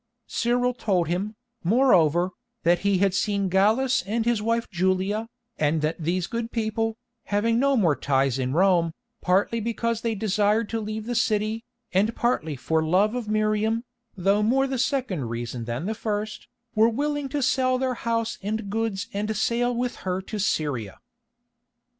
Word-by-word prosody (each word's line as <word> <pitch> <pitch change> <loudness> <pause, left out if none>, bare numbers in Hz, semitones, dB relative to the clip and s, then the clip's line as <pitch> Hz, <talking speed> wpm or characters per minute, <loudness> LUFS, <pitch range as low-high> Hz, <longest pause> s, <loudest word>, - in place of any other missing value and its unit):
Cyril 245 +1 +1
told 190 -8 0
him, 195 +5 -2 0.3
moreover, 180 - +4 0.3
that 175 +1 +4
he 200 -1 +2
had 195 0 +2
seen 200 0 0
Gallus 220 +8 +3
and 220 +4 -2
his 235 -3 +1
wife 230 +1 0
Julia, 190 +4 0 0.3
and 155 +1 +2
that 155 +2 -1
these 175 +2 0
good 230 +2 -4
people, 225 0 -1 0.3
having 225 +3 +1
no 275 0 +3
more 170 -9 +3
ties 135 -2 +1
in 130 0 -1
Rome, 170 0 +3 0.3
partly 195 +5 +2
because 230 0 -1
they 230 -1 -1
desired 210 +1 +1
to 225 - -1
leave 215 0 -4
the 245 - -2
city, 220 -1 0 0.3
and 210 +5 +2
partly 170 - 0
for 160 +5 0
love 190 +7 +3
of 245 -3 -3
Miriam, 215 +1 +1 0.3
though 195 +3 +2
more 260 +6 +3
the 265 -2 -2
second 245 - 0
reason 115 0 -4
than 120 +7 -3
the 215 - -1
first, 215 -1 -4 0.3
were 220 +1 +5
willing 290 +3 -2
to 285 0 -1
sell 255 0 +2
their 260 0 0
house 230 -1 -2
and 205 0 -3
goods 220 -3 -1
and 205 +1 -2
to 220 - -2
sail 240 +3 +1
with 245 0 -2
her 185 0 -2
to 210 +3 -6
Syria. 140 - -1
215 Hz, 165 wpm, -25 LUFS, 185-230 Hz, 0.3 s, were